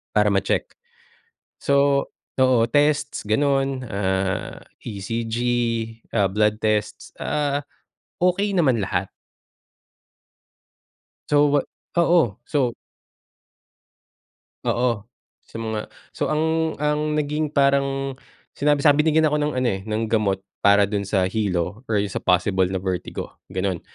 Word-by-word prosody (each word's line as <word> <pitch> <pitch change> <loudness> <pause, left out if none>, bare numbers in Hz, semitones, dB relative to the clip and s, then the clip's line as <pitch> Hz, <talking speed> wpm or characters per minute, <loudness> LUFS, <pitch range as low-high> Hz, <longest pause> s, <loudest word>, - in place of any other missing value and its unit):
Para - - +4
ma-check. - - +1 1.0
So 140 0 +3 0.3
oo 130 -3 +4
testsm 145 -3 +1
ganun 135 +2 +2 0.2
ah, 95 -2 -1 0.2
ECG 115 +2 -4 0.8
ah, 100 -4 +2
blood 105 +2 +1
tests, 105 -1 -1
ah, 145 -1 -1 0.6
okey 195 +3 +2
naman 130 - +2
lahat. - - -2 2.2
So, 145 0 +5
wa 145 0 +4 0.4
oo. 170 - +3
So 135 -5 0 1.9
Oo. 120 -3 0 0.4
Sa - - -10
mga 110 -1 -4 0.2
so, - - -2
ang 160 +1 0
ang 150 +1 0
naging 150 +1 0
parang 140 -1 +1 0.4
sinabi 145 0 +1
sabi 145 0 +6
binigyan 160 0 +3
ako 150 0 +2
ng 150 0 0
ano, 130 - +1
eh, 95 -3 -1
ng 110 +1 -1
gamot 105 -3 0 0.2
para 100 0 +5
dun 100 -1 -2
sa 95 -3 +2
hilo 95 0 -1
or 110 - +1 0.2
sa - - -3
possible 90 +1 +2
na 95 - -3
vertigo, 90 -1 -4
ganun. 95 -2 -2
120 Hz, 115 wpm, -23 LUFS, 100-145 Hz, 2.2 s, sabi